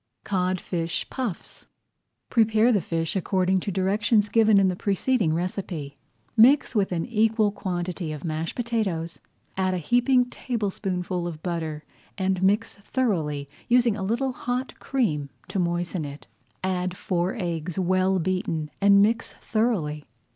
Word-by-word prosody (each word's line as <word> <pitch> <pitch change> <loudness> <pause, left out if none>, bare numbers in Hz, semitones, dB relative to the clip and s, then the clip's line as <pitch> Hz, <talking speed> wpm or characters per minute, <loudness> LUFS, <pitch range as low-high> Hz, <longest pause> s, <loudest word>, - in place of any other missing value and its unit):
CODFISH 180 -3 -2
PUFFS 245 -10 -5 0.6
Prepare 225 0 +4
the 205 -5 +2
fish 165 +3 -2
according 190 0 +1
to 200 - -3
directions 205 +3 +2
given 220 -2 +5
in 195 - +4
the 185 - 0
preceding 200 0 +1
recipe. 170 -4 -3 0.4
Mix 255 +6 +6
with 200 -5 +1
an 170 -2 -1
equal 220 -2 +2
quantity 180 -4 -3
of 150 -2 -6
mashed 160 -1 -3
potatoes, 210 -9 -2 0.4
add 185 -1 +1
a - - 0
heaping 245 - +3
tablespoonful 190 -7 -3
of 160 -2 -7
butter, 160 -4 -3 0.3
and 190 -1 0
mix 205 +4 +1
thoroughly, 170 - -1 0.2
using 240 -3 +4
a 210 - -5
little 235 +7 0
hot 250 +1 -4
cream 155 - -1 0.2
to 195 - -2
moisten 175 0 -1
it. 145 0 -8 0.4
Add 185 -1 -1
four 180 +2 -1
eggs 170 -4 -3
well 185 +1 +2
beaten 165 -4 -1
and 200 0 +6
mix 230 +2 0
thoroughly. 185 -11 -1
190 Hz, 135 wpm, -25 LUFS, 170-220 Hz, 0.6 s, Mix